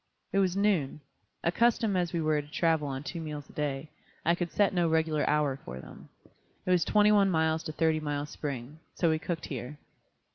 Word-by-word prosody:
It 195 Hz, -, +3 dB
was 190 Hz, -1 st, +2 dB
noon. 190 Hz, -9 st, +1 dB, 0.4 s
Accustomed 220 Hz, +3 st, +2 dB
as 175 Hz, -2 st, 0 dB
we 170 Hz, -, -1 dB
were 155 Hz, -1 st, +2 dB
to 145 Hz, -, -15 dB
travel 160 Hz, -1 st, +1 dB
on 135 Hz, 0 st, -4 dB
two 170 Hz, +3 st, -5 dB
meals 150 Hz, -2 st, -6 dB
a -, -, -21 dB
day, 145 Hz, 0 st, -3 dB, 0.3 s
I 170 Hz, -, +4 dB
could 175 Hz, -1 st, -2 dB
set 205 Hz, -2 st, +2 dB
no 175 Hz, -2 st, +2 dB
regular 160 Hz, -1 st, +1 dB
hour 150 Hz, -3 st, +2 dB
for 65 Hz, +2 st, -7 dB
them. -, -, -12 dB, 0.6 s
It 185 Hz, -, +1 dB
was 180 Hz, -2 st, +4 dB
twenty 210 Hz, 0 st, +4 dB
one 200 Hz, -2 st, +5 dB
miles 160 Hz, -2 st, +2 dB
to -, -, -3 dB
Thirty 160 Hz, 0 st, +1 dB
Mile 145 Hz, -1 st, -2 dB
Spring. 145 Hz, -1 st, -6 dB, 0.2 s
So 170 Hz, -2 st, +2 dB
we 160 Hz, -, +1 dB
cooked 160 Hz, 0 st, -4 dB
here. 130 Hz, +1 st, -6 dB
160 Hz, 205 wpm, -29 LUFS, 150-175 Hz, 0.6 s, one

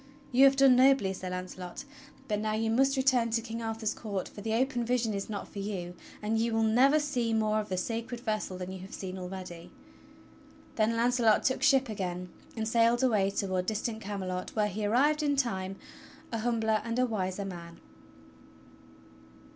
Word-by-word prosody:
You 260 Hz, +2 st, +6 dB
have 275 Hz, 0 st, +6 dB
done 270 Hz, -2 st, +6 dB
nobly. 255 Hz, -6 st, +4 dB
Sir 185 Hz, -1 st, -6 dB
Launcelot, 180 Hz, +3 st, -6 dB, 0.4 s
but 210 Hz, -2 st, 0 dB
now 215 Hz, 0 st, -1 dB
you 225 Hz, +1 st, 0 dB
must 270 Hz, +4 st, +3 dB
return 260 Hz, -3 st, +3 dB
to 230 Hz, 0 st, 0 dB
King 230 Hz, 0 st, -5 dB
Arthur's 225 Hz, -1 st, -2 dB
court, 200 Hz, -5 st, -4 dB
for 205 Hz, -, -11 dB
the 220 Hz, +1 st, -1 dB
open 250 Hz, 0 st, +1 dB
vision 235 Hz, -2 st, 0 dB
is 200 Hz, +1 st, -4 dB
not 205 Hz, -2 st, -5 dB
for 200 Hz, -, -8 dB
you, 190 Hz, -3 st, -4 dB, 0.3 s
and 220 Hz, +1 st, 0 dB
you 230 Hz, 0 st, 0 dB
wdll 225 Hz, 0 st, +2 dB
never 265 Hz, +7 st, +5 dB
see 245 Hz, -6 st, -1 dB
more 215 Hz, -1 st, +2 dB
of 215 Hz, -, -5 dB
the 185 Hz, -, -2 dB
Sacred 230 Hz, +5 st, -3 dB
Vessel 215 Hz, -5 st, -2 dB
than 180 Hz, 0 st, -6 dB
you 190 Hz, -, -7 dB
have 190 Hz, +2 st, -9 dB
seen 190 Hz, -1 st, -6 dB
already." 180 Hz, -2 st, -7 dB, 1.1 s
Then 220 Hz, +1 st, +2 dB
Launcelot 235 Hz, -2 st, +3 dB
took 260 Hz, -, +1 dB
ship 270 Hz, -3 st, +4 dB
again, 180 Hz, -4 st, -4 dB, 0.3 s
and 220 Hz, 0 st, -1 dB
sailed 230 Hz, +1 st, +3 dB
aw^ay 205 Hz, -6 st, +2 dB
toward 185 Hz, -2 st, -1 dB
dis 215 Hz, -1 st, -1 dB
tant 225 Hz, -2 st, -3 dB
Camelot 190 Hz, -3 st, -4 dB
where 210 Hz, -1 st, +2 dB
he 210 Hz, +1 st, -2 dB
arrived 290 Hz, +8 st, +3 dB
in 290 Hz, -1 st, +1 dB
time 195 Hz, -8 st, -1 dB, 0.3 s
— -, -, -21 dB
a 230 Hz, -, -2 dB
humbler 220 Hz, -2 st, +1 dB
and 230 Hz, +1 st, -3 dB
a 255 Hz, -, +3 dB
wiser 200 Hz, -4 st, -2 dB
man. 170 Hz, -3 st, -8 dB
220 Hz, 190 wpm, -30 LUFS, 195-240 Hz, 1.1 s, You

